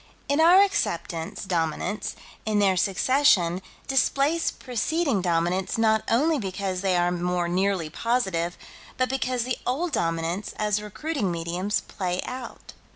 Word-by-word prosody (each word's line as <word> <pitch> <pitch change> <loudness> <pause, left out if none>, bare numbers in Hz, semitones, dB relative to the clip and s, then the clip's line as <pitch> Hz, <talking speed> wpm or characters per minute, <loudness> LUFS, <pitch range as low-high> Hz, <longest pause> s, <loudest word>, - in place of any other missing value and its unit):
In 285 +3 +2
our 360 +4 +8
acceptance, 170 - -2
Dominants, 175 +2 -2 0.3
in 215 -1 0
their 195 -2 +4
succession, 190 -2 +3 0.3
displace 275 +4 +2
preceding 265 - -1
Dominants 175 +3 0
not 220 -1 +3
only 295 +6 +3
because 190 -2 -3
they 190 -2 +2
are 175 0 +2
more 180 0 -1
nearly 185 -1 0
positive, 185 -4 -1 0.4
but 255 0 +1
because 255 -2 -1
the 250 0 -2
old 310 +8 -1
Dominants, 165 - -2
as 210 -1 0
recruiting 210 - -3
mediums, 175 +4 -1
play 180 -2 -3
out. 250 -1 -8
200 Hz, 130 wpm, -25 LUFS, 175-255 Hz, 0.4 s, our